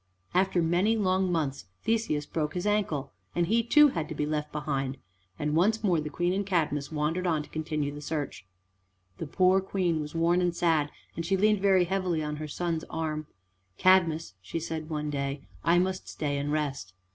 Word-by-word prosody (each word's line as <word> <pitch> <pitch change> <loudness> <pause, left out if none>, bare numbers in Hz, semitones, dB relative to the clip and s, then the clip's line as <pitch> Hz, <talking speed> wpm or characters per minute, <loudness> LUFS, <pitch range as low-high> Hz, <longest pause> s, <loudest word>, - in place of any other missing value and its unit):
After 185 -1 +2
many 180 +7 +2
long 185 -2 +2
months 145 - -1 0.2
Theseus 220 -10 0
broke 150 0 -2
his 180 - -2
ankle, 195 -10 0 0.2
and 175 - +2
he 225 +6 +3
too 295 +6 +6
had 165 - -3
to 160 - -5
be 150 - -1
left 150 0 -2
behind, 140 -3 -2 0.4
and 150 0 -1
once 215 +7 +2
more 175 -6 +3
the 150 - -4
Queen 175 +4 0
and 200 +1 0
Cadmus 155 -7 0
wandered 160 +4 -1
on 155 -3 +1
to - - -15
continue 155 -2 -2
the 145 - -8
search. 150 -8 -4 0.7
The 165 - -4
poor 185 +4 +4
Queen 180 -4 0
was 150 +2 -7
worn 170 +2 +3
and 175 -1 +1
sad, 160 -4 +2 0.3
and 165 - -3
she 190 +3 +1
leaned 210 +1 +3
very 190 -2 +5
heavily 180 -3 0
on 150 0 -3
her 155 0 -5
son's 165 +1 -2
arm. 155 -2 -3 0.5
"Cadmus," 170 - +3
she 95 - -4
said 160 -1 -5
one 150 -1 -2
day, 140 0 -3 0.2
"I 170 +1 +4
must 185 +1 0
stay 145 -2 -2
and 145 +1 -2
rest." 140 -11 -2
165 Hz, 190 wpm, -28 LUFS, 150-185 Hz, 0.7 s, too